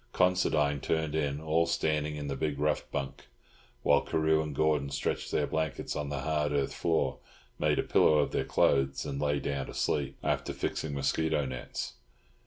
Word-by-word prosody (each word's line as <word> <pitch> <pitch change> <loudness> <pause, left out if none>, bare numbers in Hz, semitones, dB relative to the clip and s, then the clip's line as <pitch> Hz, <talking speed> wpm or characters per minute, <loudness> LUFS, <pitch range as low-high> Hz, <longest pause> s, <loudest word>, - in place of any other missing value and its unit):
Considine 75 -6 +2
turned 80 +1 -1
in 75 -2 0
all 80 +2 +1
standing 75 -2 0
in 75 -1 -5
the 70 - -2
big 75 +1 -2
rough 75 +1 0
bunk, 70 -1 -5 0.6
while - - +5
Carew 80 0 +2
and 75 -2 -5
Gordon 75 -2 +2
stretched 70 0 -2
their - - +2
blankets 80 -3 -2
on 75 -1 -3
the 70 -2 -3
hard 75 0 0
earth 70 -2 0
floor, 85 -2 0 0.4
made - - +2
a - - +2
pillow 75 - +4
of 75 - +2
their - - 0
clothes, 70 0 +2
and 70 -1 -3
lay 75 -1 +1
down 70 -1 -3
to - - -9
sleep, 70 -2 -1
after - - -1
fixing 75 -2 -3
mosquito 75 +2 +1
nets. 65 0 -5
75 Hz, 180 wpm, -30 LUFS, 70-80 Hz, 0.6 s, while